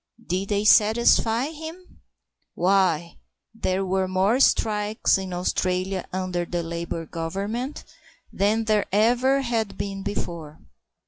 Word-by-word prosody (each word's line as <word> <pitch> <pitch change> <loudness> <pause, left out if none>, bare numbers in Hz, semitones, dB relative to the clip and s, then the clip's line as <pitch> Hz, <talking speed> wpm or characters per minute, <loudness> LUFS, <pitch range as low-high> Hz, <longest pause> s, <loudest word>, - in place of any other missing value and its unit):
Did 185 +2 -2
they 205 0 0
satisfy 225 +4 +4
him? 325 +4 -10 0.5
Why, 175 -3 +1 0.3
there 195 -3 -1
were 190 0 0
more 190 +6 +2
strikes 210 -5 +2
in 190 -1 -6
Australia 185 +1 -1
under 185 -1 -2
the 175 0 -3
Labour 170 0 -4
Government 200 - -4 0.5
than 215 +3 +1
there 215 -1 +1
ever 245 +6 +3
had 230 -5 -2
been 195 -1 -4
before." 170 -6 -5
195 Hz, 115 wpm, -24 LUFS, 180-225 Hz, 0.5 s, satisfy